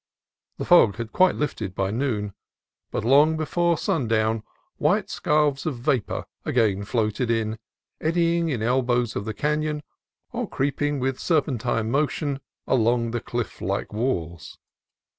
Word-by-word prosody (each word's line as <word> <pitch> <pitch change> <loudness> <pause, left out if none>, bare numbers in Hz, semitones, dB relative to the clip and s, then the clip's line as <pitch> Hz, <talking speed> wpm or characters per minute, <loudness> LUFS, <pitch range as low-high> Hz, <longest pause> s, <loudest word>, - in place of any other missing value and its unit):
The - - -4
fog 145 - +6
had 115 0 -5 0.2
lifted 110 -10 -3
by 95 0 0
noon, 110 -4 -1 0.6
but - - -3
long 145 +5 +5
before 170 +2 +1
sundown 115 - +1 0.4
white - - +1
scarfs 150 -2 +1
of 140 -6 -2
vapor 125 -2 -1 0.2
again 105 -5 +1
floated 110 +2 0
in, 110 -1 0 0.4
eddying 170 +1 +1
in 120 -7 -1
elbows 120 -1 +1
of 100 - -3
the 110 - -3
canon 150 +1 -1 0.5
or - - -3
creeping 145 +1 -1
with 130 0 -1
serpentine 125 -8 0
motion 145 0 0 0.3
along 115 -1 +2
the 120 0 -2
cliff 120 -1 -4
like 100 +3 -2
walls. 85 - -3
125 Hz, 130 wpm, -24 LUFS, 110-150 Hz, 0.6 s, fog